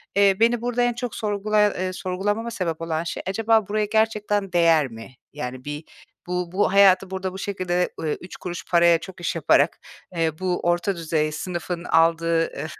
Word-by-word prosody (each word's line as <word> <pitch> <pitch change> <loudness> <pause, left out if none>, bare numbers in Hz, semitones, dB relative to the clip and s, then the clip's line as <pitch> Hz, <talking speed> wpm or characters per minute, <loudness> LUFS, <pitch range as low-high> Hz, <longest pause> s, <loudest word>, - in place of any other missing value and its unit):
eee, 200 -1 +4
beni 235 0 +3
burada 245 0 -1
en 245 0 +2
çok 245 -1 -5
sorgulaya 210 -1 +1
eee, 185 0 -3
sorgulamama 205 +6 -2
sebep 165 -6 -3
olan 165 0 -2
şey, 170 - -5
acaba 220 +1 +2
buraya 210 0 0
gerçekten 210 -3 0
değer 165 -4 +4
mi? 115 +2 -11 0.2
Yani, 130 -2 -6
bir, 145 +2 -5 0.4
“Bu 180 -1 -2
bu 190 0 +1
hayatı 195 -1 +5
burada 190 -1 -4
bu - - -7
şekilde, 180 -3 -1
eee, 155 - -1
3 180 - -10
kuruş 175 -1 -6
paraya 170 -1 +5
çok 190 -1 -11
iş 170 - -2
yaparak, 155 0 +3 0.4
eee, 160 -1 -1
bu 185 -1 -1
orta 175 +3 0
düzey 155 -2 -1
sınıfın 175 +1 -4
aldığı, 165 0 +2
eee, 155 - -5
180 Hz, 180 wpm, -23 LUFS, 165-205 Hz, 0.4 s, hayatı